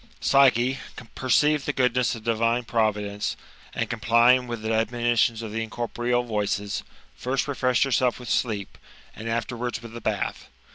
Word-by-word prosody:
Psyche 130 Hz, -, +4 dB, 0.3 s
perceived 145 Hz, +2 st, +2 dB
the -, -, 0 dB
goodness 125 Hz, -1 st, +1 dB
of 115 Hz, -, -10 dB
divine 115 Hz, +1 st, +1 dB
providence, 105 Hz, -3 st, -1 dB, 0.4 s
and -, -, -1 dB
complying 120 Hz, +2 st, +4 dB
with 120 Hz, -2 st, -5 dB
the 110 Hz, 0 st, -1 dB
admonitions 115 Hz, 0 st, +1 dB
of 110 Hz, -, -6 dB
the 115 Hz, +1 st, -2 dB
incorporeal 120 Hz, +2 st, -1 dB
voices, 105 Hz, -2 st, -2 dB, 0.3 s
first 130 Hz, -, -1 dB
refreshed 125 Hz, -3 st, +2 dB
herself 130 Hz, -2 st, +1 dB
with 125 Hz, -, -9 dB
sleep, 105 Hz, -4 st, -1 dB, 0.4 s
and 115 Hz, +1 st, -6 dB
afterwards 120 Hz, +1 st, -2 dB
with 115 Hz, -1 st, -10 dB
the 115 Hz, -, -7 dB
bath. -, -, -3 dB
120 Hz, 145 wpm, -25 LUFS, 110-125 Hz, 0.4 s, Psyche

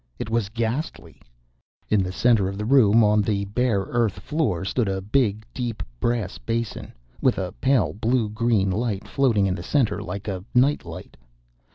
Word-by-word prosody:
It 110 Hz, -, -5 dB
was 115 Hz, -4 st, 0 dB
ghastly. 115 Hz, +7 st, -4 dB, 0.7 s
In 105 Hz, -2 st, +3 dB
the 90 Hz, -1 st, -2 dB
center 110 Hz, -1 st, +3 dB
of 100 Hz, -, -6 dB
the 105 Hz, -, -3 dB
room, 115 Hz, -3 st, +5 dB
on 105 Hz, 0 st, +4 dB
the 100 Hz, -1 st, -1 dB
bare 110 Hz, 0 st, 0 dB
earth 115 Hz, 0 st, 0 dB
floor, 125 Hz, -, -1 dB
stood 110 Hz, +3 st, 0 dB
a 95 Hz, 0 st, -1 dB
big, 110 Hz, 0 st, 0 dB
deep, 120 Hz, -4 st, -4 dB, 0.2 s
brass 115 Hz, -, -1 dB
basin, 115 Hz, 0 st, -3 dB, 0.3 s
with 130 Hz, -, +2 dB
a 90 Hz, -2 st, -3 dB
pale 135 Hz, 0 st, +2 dB
blue 115 Hz, +2 st, 0 dB
green 105 Hz, -3 st, +1 dB
light 105 Hz, 0 st, -2 dB
floating 120 Hz, -8 st, +2 dB
in 95 Hz, -, +1 dB
the 85 Hz, -, -5 dB
center 105 Hz, -1 st, 0 dB
like 100 Hz, +2 st, -6 dB
a 95 Hz, -3 st, -4 dB
night 135 Hz, +4 st, +3 dB
light. -, -, -10 dB
110 Hz, 175 wpm, -24 LUFS, 100-120 Hz, 0.7 s, room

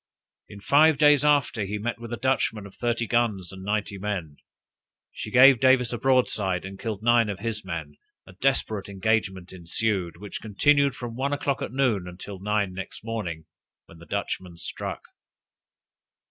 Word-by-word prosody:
In 100 Hz, -, -11 dB
five 150 Hz, +6 st, +5 dB
days 150 Hz, -1 st, +5 dB
after 145 Hz, -7 st, +2 dB
he 100 Hz, +2 st, -3 dB
met 115 Hz, +3 st, -3 dB
with 115 Hz, 0 st, -8 dB
a 120 Hz, -, -3 dB
Dutchman 115 Hz, -5 st, 0 dB
of 100 Hz, -, -12 dB
thirty 120 Hz, -1 st, -1 dB
guns 110 Hz, -6 st, 0 dB
and 95 Hz, -1 st, -10 dB
ninety 105 Hz, 0 st, -2 dB
men. 90 Hz, -8 st, -4 dB, 0.7 s
She -, -, -7 dB
gave 130 Hz, +2 st, +7 dB
Davis 130 Hz, -1 st, +4 dB
a 120 Hz, -, -3 dB
broadside, 105 Hz, -9 st, +1 dB
and 95 Hz, 0 st, -8 dB
killed 110 Hz, -3 st, -4 dB
nine 120 Hz, -2 st, +4 dB
of 100 Hz, -, -3 dB
his 110 Hz, -1 st, -3 dB
men; 80 Hz, -5 st, -6 dB, 0.3 s
a 95 Hz, -, -14 dB
desperate 110 Hz, -3 st, -1 dB
engagement 95 Hz, -2 st, -1 dB
ensued, 90 Hz, 0 st, -2 dB
which 100 Hz, +2 st, -7 dB
continued 140 Hz, +6 st, +2 dB
from 120 Hz, -2 st, -6 dB
one 140 Hz, +3 st, -1 dB
o'clock 140 Hz, -1 st, -1 dB
at -, -, -4 dB
noon 120 Hz, -9 st, +1 dB
until 95 Hz, +2 st, -8 dB
nine 105 Hz, -1 st, 0 dB
next 95 Hz, +3 st, -8 dB
morning, 90 Hz, -8 st, -4 dB, 0.4 s
when 85 Hz, -, -16 dB
the 85 Hz, -, -14 dB
Dutchman 95 Hz, -3 st, -4 dB
struck. -, -, -5 dB
105 Hz, 165 wpm, -25 LUFS, 95-120 Hz, 0.7 s, gave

